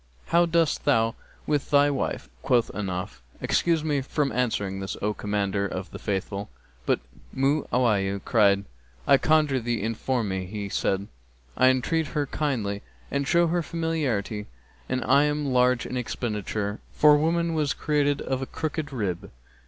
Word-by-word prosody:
'How 170 +1 +4
dost 165 -2 +1
thou 115 -5 +3 0.3
with 145 -2 0
thy 145 0 +5
wife?' 135 - -2
Quoth 120 - +2
Ahnaf, 90 -9 -4 0.2
'Excuse 165 -3 +1
me 145 -3 0
from 140 +1 -1
answering 105 -5 -1
this, 95 0 -4
O 105 +1 0
Commander 100 -1 -1
of 95 0 -6
the - - -8
Faithful!'; 100 0 -3 0.4
but - - +3 0.4
Mu'awiyah 120 -8 +1
cried, 100 -3 +4 0.4
'I 140 - +6
conjure 155 -4 +3
thee 120 0 -1
inform 115 +1 -1
me.' 95 -1 -3
He 100 0 -5
said, 95 0 0 0.5
'I 130 - +5
entreat 150 +5 +1
her 145 - +2
kindly 120 -9 -2 0.3
and 140 0 -1
show 170 +3 +4
her 170 +1 +1
familiarity 145 -12 -2 0.4
and 130 0 -1
am 145 +2 +3
large 125 -1 +3
in - - -5
expenditure, 105 -4 -3
for 150 0 +6
woman 165 +2 +1
was 150 -3 0
created 145 -2 +1
of 130 0 -2
a 135 - -3
crooked 155 -2 -3
rib.' 100 -9 -3
125 Hz, 150 wpm, -26 LUFS, 105-150 Hz, 0.5 s, I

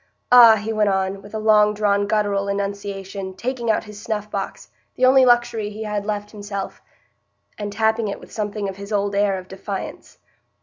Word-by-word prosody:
"Ah!" 235 -3 +9
he 220 +1 -3
went 210 -1 +2
on, 190 0 -1
with 205 +2 -11
a - - 0
long 210 -1 +4
drawn 205 -1 +1
guttural 205 -2 0
enunciation, 200 -1 -4
taking 240 +2 -3
out 220 - +2
his 210 -1 -11
snuff 210 -1 -4
box, 195 -1 -5 0.3
the 255 - +3
only 260 0 +6
luxury 240 -3 +2
he 215 +1 -7
had 210 -1 -3
left 210 -1 -3
himself, 200 -2 -6 0.7
and 205 -1 -5
tapping 220 +1 +1
it 200 - -4
with - - -15
something 210 -1 -3
of 195 -1 -6
his 200 +1 -9
old 205 -1 0
air 200 -1 +2
of 185 0 -9
defiance. 195 +1 -7
205 Hz, 185 wpm, -21 LUFS, 200-220 Hz, 0.7 s, Ah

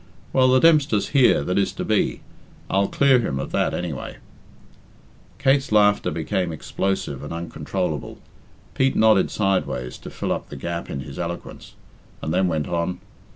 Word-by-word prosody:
Well, 130 -1 +5
the 130 0 +5
Dempster's 145 -10 +3
here 130 - +4
that 90 +5 0
is 100 - +1
to - - -4
be - - 0 0.5
I'll 100 +1 +2
clear 135 -2 +4
him 90 - -2
of 70 - -5
that, - - +1
anyway." 85 -6 -5 1.2
Kate's 135 -1 +2
laughter 105 -1 +4
became 85 +3 -2
explosive 80 -3 -3
and 75 - -7
uncontrollable. 85 0 -4 0.6
Pete 135 0 +1
nodded 110 -3 +4
sideways 95 -11 -1
to - - -9
fill - - -4
up - - -3
the - - -8
gap 85 +5 -5
in 70 - -4
his 70 0 -9
eloquence, 85 0 -6 0.4
and 80 - -3
then 95 - +2
went 80 -4 -1
on. 85 +1 -2
95 Hz, 155 wpm, -23 LUFS, 80-110 Hz, 1.2 s, Well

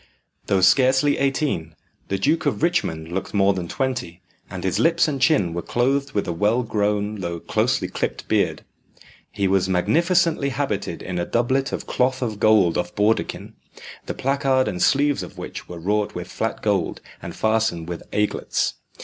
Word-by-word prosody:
Though 95 -2 +2
scarcely 130 +9 +4
eighteen, 135 - -1 0.3
the 95 - -1
Duke 150 +9 +1
of 145 - -1
Richmond 85 - 0
looked 95 +3 -4
more 100 0 +4
than 90 -2 -4
twenty, 120 -8 -3 0.3
and - - -6
his 95 - 0
lips 165 0 +3
and 140 -3 -3
chin 130 - +3
were 85 - -2
clothed 135 +6 0
with 100 - -1
a 85 - -1
well 105 +8 +1
grown 105 -1 -1
though 85 -2 -4
closely - - 0
clipped - - -4
beard. - - 0 0.7
He 100 - 0
was 95 0 +2
magnificently 165 - +2
habited 120 -10 -3
in 90 -1 -3
a 85 - -1
doublet 130 +3 +1
of - - -4
cloth 130 +1 0
of 110 -4 -3
gold 105 -7 +4
of 90 0 -4
bawdekin, 105 +2 0 0.5
the - - -3
placard 135 -1 +1
and 90 - -3
sleeves 145 +1 +3
of - - -9
which - - -8
were 90 - -7
wrought 105 +5 -1
with - - -6
flat - - -3
gold, - - 0 0.2
and - - -7
fastened 110 -7 0
with 85 -1 -5
aiglets. 105 0 0
105 Hz, 170 wpm, -22 LUFS, 90-135 Hz, 0.7 s, scarcely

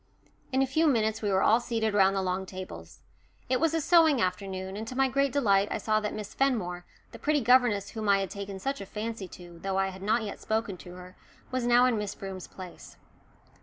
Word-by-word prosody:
In 265 +1 +3
a - - +2
few 315 +5 +2
minutes 220 -6 +1
we 210 - 0
were 190 - +3
all 225 - +5
seated 225 -3 -1
round 195 -1 +4
the 195 - 0
long 185 +1 -2
tables. 185 0 -9 0.5
It 255 -1 +2
was 325 0 +2
a - - +2
sewing 320 -3 +5
afternoon, 190 -1 -2
and 220 +2 -5
to 255 - -6
my 270 +1 +3
great 275 +1 +1
delight 205 -7 +3
I - - -1
saw 215 -1 +1
that 210 -1 -3
Miss 210 -1 -6
Fenmore, 180 -10 -1 0.2
the - - -11
pretty 300 0 +2
governess 235 -5 +3
whom 220 -3 -3
I 200 - +6
had 195 -1 -3
taken 200 -1 -6
such 275 +7 -3
a 195 - -7
fancy 215 -1 -5
to, 175 -1 -12
though 195 -1 -2
I 195 0 +1
had 190 0 -10
not 220 +3 +1
yet 205 - -6
spoken 220 -2 -2
to 180 0 -11
her, 180 0 -11 0.4
was 255 -2 -1
now 245 +1 +6
in 240 -4 +2
Miss 210 -1 -4
Broom's 190 -2 -7
place. 185 -2 -11
210 Hz, 230 wpm, -28 LUFS, 190-250 Hz, 0.5 s, I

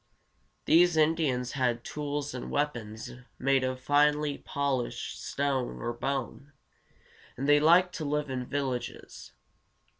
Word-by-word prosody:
These 175 0 +5
Indians 150 -6 +2
had 125 -3 0
tools 145 0 -4
and 125 - -6
weapons 120 -7 -3 0.3
made 135 0 +2
of 130 0 -2
finely 145 +1 +2
polished 140 -4 -3
stone 135 -3 -1
or 120 0 -3
bone, 135 +3 -4 0.8
and 135 +3 -2
they 145 0 +6
liked 175 +4 +5
to 155 - -4
live 150 +1 -1
in 125 -1 -3
villages. 135 -4 -4
140 Hz, 120 wpm, -29 LUFS, 125-150 Hz, 0.8 s, they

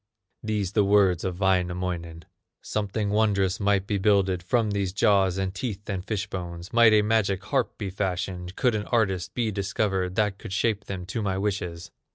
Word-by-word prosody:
These 105 -4 -2
the 105 0 +3
words 100 -4 +3
of 90 -1 -3
Wainamoinen: 90 -3 -1 0.4
"Something 105 0 -2
wondrous 100 -3 +2
might 100 -1 +2
be 100 -1 -1
builded 95 -2 +2
From 110 +4 +1
these 100 -2 -1
jaws, 95 -2 +3
and 95 -1 -2
teeth, 100 0 -5
and 95 -3 -3
fish 105 -1 -2
bones; 85 0 -7
Might 115 -1 +7
a 105 -1 +5
magic 105 -3 +1
harp 125 +4 -1
be 100 -3 -4
fashioned, 90 -1 -3
Could 125 -3 +2
an 105 -1 -2
artist 95 -7 0
be 115 -3 0
discovered 95 -2 -1
That 105 -2 0
could 105 -4 -7
shape 105 0 0
them 95 -2 -5
to 100 +5 -3
my 95 -2 -1
wishes." 90 -4 -3
100 Hz, 180 wpm, -26 LUFS, 95-105 Hz, 0.4 s, Might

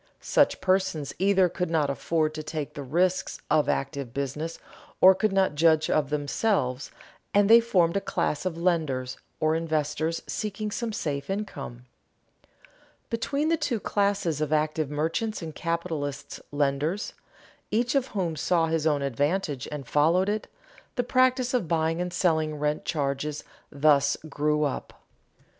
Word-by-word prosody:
Such - - +2
persons 185 -6 0
either 190 -1 +4
could 180 0 -3
not 155 -4 +1
afford 155 +2 0
to 155 - -5
take 155 -1 -5
the 145 - -6
risks 180 +7 0
of 150 - +3
active 135 -3 -2
business, 145 +4 -3 0.4
or 190 +1 +9
could 195 +2 0
not 195 -5 +2
judge 155 0 +3
of 145 -3 +1
them, 150 -1 -1 1.1
and 205 0 +5
they 230 +2 +9
formed 185 -7 +2
a 200 - +1
class 150 - -1
of 180 -3 -3
lenders 155 -8 -1 0.2
or 155 0 +2
investors 160 0 -1
seeking 210 0 -3
some 235 +1 -2
safe 140 -7 -3
income. 195 - -5 1.3
Between 280 +6 0
the 330 - +3
two 285 -7 -1
classes 200 -7 0
of 155 -1 -1
active 155 -1 +1
merchants 165 +8 -2
and 160 -1 -6
capitalist 165 -5 -3
lenders, 145 +7 -1 0.6
each 235 +3 +1
of 275 -2 +1
whom 180 -8 -2
saw 165 +2 +2
his 160 -1 0
own 145 -2 +1
advantage 145 +1 -1
and 145 -4 -6
followed 165 +8 +3
it, 210 +1 -2 0.5
the 245 - +1
practice 255 0 +2
of 240 -9 +1
buying 165 0 0
and 180 0 -2
selling 160 -4 +1
rent 150 0 -1
charges 145 -1 -2 0.3
thus 140 -1 +3
grew 150 +1 0
up. 145 - -3
160 Hz, 150 wpm, -27 LUFS, 150-190 Hz, 1.3 s, or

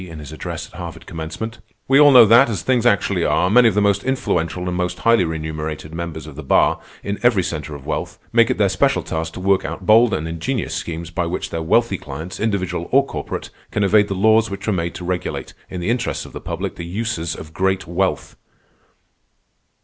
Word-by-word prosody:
in 80 - -9
his 75 -2 -9
address 80 - -6
at - - -13
Harvard 85 -1 -8
Commencement: 85 +7 -6 0.3
"_We 135 +2 +6
all 145 - +8
know 125 -4 +9
that, 120 +4 +6
as 100 -7 -3
things 125 -2 +2
actually 100 -6 +2
are, 90 +2 +2
many 120 +1 +6
of 110 - +1
the 105 - +3
most 100 -1 +2
influential 90 -9 -1
and 90 - -2
most 90 0 -2
highly 115 -4 +3
remunerated 80 -1 -5
members 85 -2 -5
of 75 -3 -10
the 80 - -7
Bar 70 - +3 0.2
in 100 +1 -3
every 120 -6 +3
centre 75 -4 -4
of 70 - -11
wealth, - - -3 0.2
make - - +5
it - - 0
their - - +3
special - - +1
task 80 0 -4
to - - -7
work 95 +1 +2
out 95 - -6
bold 110 +2 +5
and 80 - -3
ingenious 85 +8 -3
schemes 85 0 -5
by 85 0 -1
which 85 - -4
their 80 - -3
wealthy 100 +4 +2
clients, 80 +6 -7
individual 95 -5 -2
or 140 +1 +5
corporate, 75 - -6 0.2
can 105 - -1
evade 105 +1 +4
the 95 - -3
laws 110 +3 +4
which 100 - -6
were 110 - +1
made 85 -2 -2
to 90 - -7
regulate, 90 -2 -3 0.2
in 90 - -5
the 90 - 0
interests 120 -1 -2
of - - -13
the - - -7
public, - - -4
the - - -5
uses 85 -3 -3
of 80 0 -10
great 95 +1 0
wealth. 85 0 -1
90 Hz, 220 wpm, -20 LUFS, 80-110 Hz, 0.3 s, know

